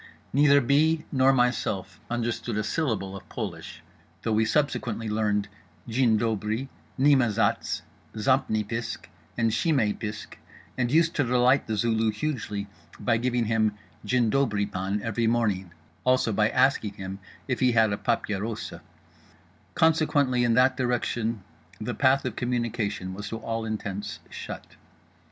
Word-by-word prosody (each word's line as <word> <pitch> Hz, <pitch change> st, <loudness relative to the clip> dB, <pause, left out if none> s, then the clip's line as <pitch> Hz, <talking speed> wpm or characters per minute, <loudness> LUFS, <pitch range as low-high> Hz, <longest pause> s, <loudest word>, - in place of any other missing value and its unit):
Neither 140 Hz, +1 st, +5 dB
B. 155 Hz, +5 st, +2 dB
nor 130 Hz, -1 st, +4 dB
myself 100 Hz, -8 st, 0 dB
understood 120 Hz, -1 st, -2 dB
a 110 Hz, -, 0 dB
syllable 105 Hz, -8 st, -1 dB
of 95 Hz, -, -11 dB
Polish -, -, -6 dB, 0.4 s
(tho' 115 Hz, -, -1 dB
we 110 Hz, +1 st, +3 dB
subsequently 120 Hz, -4 st, 0 dB
learned 105 Hz, -1 st, 0 dB, 0.4 s
Jin 115 Hz, -1 st, +3 dB
dobri, 110 Hz, +3 st, -1 dB, 0.3 s
nima 135 Hz, -3 st, +5 dB
Zatz, 105 Hz, -1 st, 0 dB, 0.3 s
zampni 110 Hz, -2 st, +1 dB
pisk 115 Hz, +1 st, -4 dB, 0.3 s
and 115 Hz, -1 st, +2 dB
shimay 120 Hz, -6 st, +2 dB
pisk, 105 Hz, -1 st, -7 dB, 0.4 s
and 120 Hz, -1 st, 0 dB
used 165 Hz, +2 st, +4 dB
to 145 Hz, -, +3 dB
delight 125 Hz, +2 st, +3 dB
The 110 Hz, -, -1 dB
Zulu 110 Hz, 0 st, +2 dB
hugely 105 Hz, -3 st, -3 dB, 0.3 s
by 115 Hz, -2 st, +2 dB
giving 120 Hz, 0 st, 0 dB
him 110 Hz, -1 st, +1 dB, 0.3 s
"Jin 125 Hz, -3 st, +2 dB
dobri, 110 Hz, -7 st, +1 dB
pan" 95 Hz, +2 st, -3 dB
every 115 Hz, 0 st, 0 dB
morning, 105 Hz, -6 st, 0 dB, 0.3 s
also 130 Hz, -3 st, +2 dB
by 105 Hz, +1 st, +3 dB
asking 110 Hz, -7 st, +2 dB
him 95 Hz, 0 st, -6 dB, 0.3 s
if 125 Hz, -, -1 dB
he 125 Hz, -2 st, +3 dB
had 110 Hz, -2 st, +4 dB
a -, -, -1 dB
"papierosa"); 110 Hz, -1 st, -2 dB, 0.9 s
consequently 145 Hz, -6 st, +3 dB
in 115 Hz, -1 st, +3 dB
that 130 Hz, +1 st, +4 dB
direction 120 Hz, -3 st, -1 dB, 0.4 s
the 120 Hz, +3 st, -3 dB
path 135 Hz, +1 st, +3 dB
of 125 Hz, -4 st, -3 dB
communication 115 Hz, -6 st, -2 dB
was 100 Hz, +1 st, -6 dB
to 115 Hz, -, -4 dB
all 115 Hz, 0 st, -3 dB
intents 105 Hz, -2 st, -4 dB
shut. -, -, -7 dB
115 Hz, 140 wpm, -26 LUFS, 105-130 Hz, 0.9 s, Neither